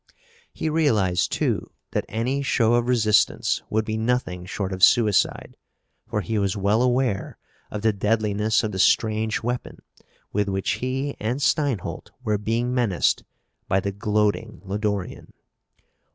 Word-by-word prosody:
He - - -4
realized, 115 - +2
too, - - -1 0.2
that - - -1
any 125 +6 -1
show 120 -4 +2
of 120 0 +2
resistance 110 -5 +2
would 110 0 0
be 110 0 -2
nothing 110 -6 -1
short 95 0 -3
of 95 +1 -4
suicide, 110 -2 +3 0.5
for 105 - -1
he 105 +4 -1
was 100 +1 0
well 100 +4 +2
aware 125 -4 0 0.3
of 105 0 -5
the 110 -1 +3
deadliness 105 +1 +1
of 110 - -2
the 95 - -4
strange 110 +3 +2
weapon 120 +1 -3 0.6
with 105 0 0
which 95 0 -1
he 135 +3 -2
and 120 +5 -2
Steinholt 130 - -1
were 105 -3 0
being 115 +4 -1
menaced 115 -8 +1 0.4
by 95 - +2
the 100 +1 -2
gloating 105 +2 -1
Lodorian. 100 -1 -3
110 Hz, 140 wpm, -24 LUFS, 100-120 Hz, 0.6 s, suicide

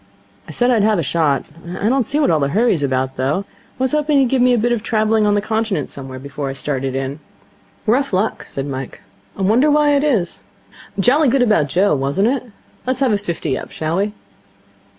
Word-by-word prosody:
I - - -8
said 245 +1 +2
I'd 230 -3 +3
have 215 0 +3
a 170 - 0
shot. 150 -1 +1 0.3
I 205 - 0
don't 255 -1 +1
see 290 +2 0
what 290 - +3
all 160 - +2
the 140 - +1
hurry's 205 -2 +2
about, 130 -1 -1
though. 140 +10 -1 0.3
I - - 0
was 260 - +1
hoping 300 -1 +2
he'd 265 -3 +3
give 260 -1 +2
me 250 0 +5
a 245 - +3
bit 240 +2 +1
of 235 -3 0
travelling 215 -1 +1
on 205 - +3
the 205 - +1
Continent 220 -8 -1
somewhere 130 -1 -8
before 140 +1 -5
I - - -4
started 135 -1 -3
in.' 135 +2 -3 0.7
'Rough 265 +5 +1
luck,' 195 +3 -1
said 135 - -5
Mike. 135 -2 -6 0.4
'I 195 - -2
wonder 235 +10 +4
why 295 0 +4
it 285 0 +2
is. 225 - 0 0.6
Jolly 275 +9 +4
good 260 +1 +3
about 190 - +2
Joe, 190 +5 +2
wasn't 140 - +1
it? 255 -3 -3 0.4
Let's 255 +1 -1
have 215 -7 +2
fifty 165 -7 -2
up, - - -6
shall 160 +2 -3
we?' 205 +2 0
205 Hz, 215 wpm, -19 LUFS, -, 0.7 s, me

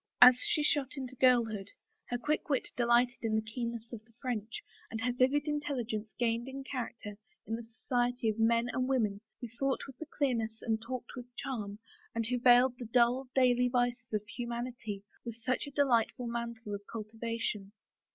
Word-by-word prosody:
As 250 +1 +11
she 300 - +1
shot 290 -2 +1
into 260 -1 -5
girlhood, 230 -6 +3 0.4
her 245 - 0
quick 300 +6 -1
wit 275 -3 +1
delighted 240 0 +3
in 220 -1 0
the 220 - +3
keenness 235 +1 -5
of 220 -2 -7
the 230 +1 -27
French 230 -4 -3 0.3
and 225 - -4
her 245 +2 +1
vivid 265 +4 +2
intelligence 245 -8 -2
gained 235 0 0
in 270 +1 -6
character 235 -6 -5 0.3
in 225 - -4
the 235 - -5
society 245 +1 -1
of 220 0 0
men 230 +1 +3
and 255 0 0
women 215 -6 +1 0.2
who 240 - -4
thought 275 -1 +1
with 270 0 -12
clearness 230 -6 -1
and 220 -2 0
talked 245 +1 -5
with 245 -1 -7
charm, 210 -7 -4 0.4
and 230 0 0
who 250 +2 0
veiled 245 +1 +6
the 245 - -5
dull, 245 +3 +3
daily 250 -1 +5
vices 245 -1 0
of 210 -1 0
humanity 235 -3 -4 0.2
with 235 -2 -5
such 250 +4 -1
a - - -7
de 285 +1 +3
lightful 240 -1 +2
mantle 235 -2 -4
of 200 - -4
cultivation. 225 -2 -3
240 Hz, 180 wpm, -32 LUFS, 225-255 Hz, 0.4 s, As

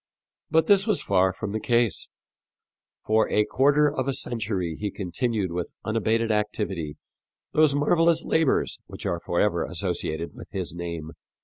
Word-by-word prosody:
But 160 0 +3
this 200 0 +4
was 210 -5 +2
far 95 -1 +2
from 100 +2 -5
the 110 - -2
case. 120 -3 +1 1.0
For 110 0 +3
a 105 - +3
quarter 145 +5 +3
of 130 -2 -1
a 135 - +1
century 105 - -2
he 105 +4 -3
continued 100 +1 -2
with 85 0 -4
unabated 115 +1 +1
activity 105 -7 -2 0.5
those 155 -2 +4
marvelous 165 +3 +3
labors 160 -4 +1
which - - -9
are - - -1
forever - - +1
associated 80 +2 -3
with - - -11
his 95 -4 -4
name. 85 -2 -5
110 Hz, 145 wpm, -25 LUFS, 95-140 Hz, 1.0 s, this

